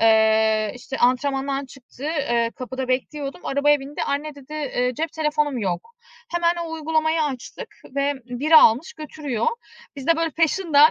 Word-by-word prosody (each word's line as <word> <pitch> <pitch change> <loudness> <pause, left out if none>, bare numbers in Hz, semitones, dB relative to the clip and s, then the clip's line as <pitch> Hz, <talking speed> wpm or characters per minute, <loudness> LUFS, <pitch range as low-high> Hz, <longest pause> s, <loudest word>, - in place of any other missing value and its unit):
eee, 220 -1 +4
işte, 265 +2 -7
antrenmandan 270 +2 +1
çıktı. 265 0 -13
Eee, 240 -7 0
kapıda 260 0 -5
bekliyordum. 275 +3 -2
Arabaya 290 +1 +3
bindi. 275 +2 -5
"Anne" 290 +2 -2
dedi, 280 +1 -13
eee, 255 -4 -1
"cep 320 +4 -3
telefonum 300 -3 0
yok." 190 - -3 0.4
Hemen 345 0 +2
o 330 - -7
uygulamayı 315 0 +1
açtık 265 -5 -5 0.3
ve 280 +1 +2
biri 275 +6 +3
almış 250 +3 +6
götürüyor. 295 -6 -4 0.5
Biz 275 -1 -7
de 330 - +4
böyle 330 0 0
peşinden 320 -1 +4
280 Hz, 150 wpm, -23 LUFS, 250-310 Hz, 0.5 s, almış